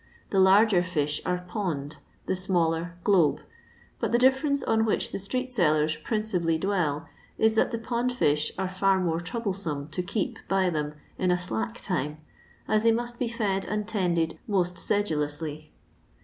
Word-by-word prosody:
The 195 - +2
larger 195 0 +6
fish 150 -5 -1
are 180 0 -1
"pond;" 160 -9 -3 0.3
the - - 0
smaller, 170 -2 0
"glebe." 180 -8 +3 0.6
But - - -1
the 240 - +4
difiference 265 +3 +3
on 220 0 +2
which 220 - 0
the - - -3
street 255 +6 -2
saUcn 155 -8 +2
principally 185 -7 0
dwell 160 -5 -1 0.3
is 220 0 +4
that 220 - +3
the 230 - -1
pond 240 +2 -1
fish 150 -11 +1
are 190 - -1
bt 195 -1 +3
more 165 -2 0
troublesome 175 -6 -3
to 180 - -2
keep 200 +2 -3
by 190 -2 +2
them 150 -1 -2 0.2
in 185 - +1
a 180 - +4
'^ - - -1
slack 110 -11 -3
time," 150 +3 -2 0.5
as 215 0 +3
they 230 +1 +5
must 240 +1 -2
be 245 - 0
fed 205 -4 -1
and 210 0 -2
tended 175 -6 0
most 180 -3 0
sedulously. 155 -5 -1
185 Hz, 165 wpm, -27 LUFS, 160-215 Hz, 0.6 s, larger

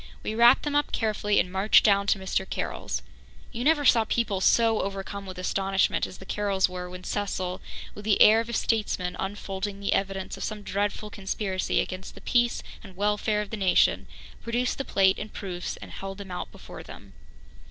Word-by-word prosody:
We - - -2
wrapped 235 +3 +6
them 295 -1 -2
up 290 0 +1
carefully 210 -2 +1
and 180 - 0
marched 195 +3 +5
down 200 -1 +3
to 200 - +3
Mr. 190 0 -2
Carroll's. - - -3 0.5
You 235 - -4
never 295 0 +3
saw 230 -3 +6
people 210 -4 -1
so 225 +1 +4
overcome 195 0 -5
with 185 -1 -8
astonishment 195 +1 +1
as 185 - -11
the 190 - -12
Carrolls 200 -2 +1
were 180 0 -6
when 180 0 -9
Cecil, 185 -3 -3 0.3
with 205 - -10
the 210 -1 +2
air 220 +1 +8
of 230 - -7
a - - -4
statesman 205 -6 0
unfolding 195 0 -4
the 200 - 0
evidence 195 -1 -2
of - - -5
some 210 -1 -4
dreadful 205 +2 -2
conspiracy 195 -1 -2
against 185 +1 -4
the - - -12
peace 240 -1 +1 0.2
and 195 -4 -12
welfare 210 +1 +1
of 210 - -12
the 220 - -3
nation, 190 -3 +3 0.3
produced 240 +3 -1
the 275 - -2
plate 190 0 +3
and 210 - -5
the - - -22
proofs, 180 -3 -5
and - - -10
held 195 0 -7
them 200 -2 -9
out 180 - -5
before - - -11
them. - - -12
200 Hz, 195 wpm, -27 LUFS, 190-220 Hz, 0.5 s, air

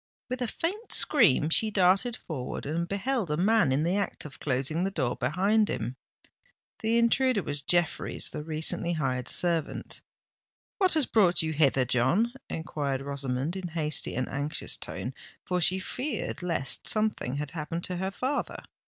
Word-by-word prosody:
With 255 0 -3
a 245 - 0
faint 390 - -3
scream 205 - +4
she 220 +6 +3
darted 195 +4 +3
forward, 150 - -5
and 165 +4 -1
beheld 205 - -1
a 150 - 0
man 205 -4 +3
in 140 +3 +2
the 175 +3 +1
act 200 -5 -3
of 145 - -10
closing 140 +5 0
the 195 - +1
door 130 -10 -1
behind 195 - +2
him. 120 +3 -3 0.8
The 225 +1 +1
intruder 235 -2 +3
was 145 0 -4
Jeffreys, 175 +2 -1
the - - -4
recently 160 +2 -1
hired 130 -5 -1
servant. 170 -3 0 0.8
"What 375 -4 +4
has 310 -4 +3
brought 185 -8 +3
you 160 0 -1
hither, 135 -4 +3
John?" 130 - +2 0.2
enquired 145 -4 -2
Rosamond, 140 +2 -2
in 190 -2 -4
hasty 155 -2 -1
and 130 +1 -1
anxious 145 +3 -1
tone—for 180 -1 -5
she 185 +3 +7
feared 250 +2 -4
lest 165 -7 -1
something 215 - 0
had 145 0 -4
happened 165 +1 -4
to 180 - -2
her 190 +2 -1
father. 260 +8 -3
170 Hz, 160 wpm, -28 LUFS, 145-215 Hz, 0.8 s, she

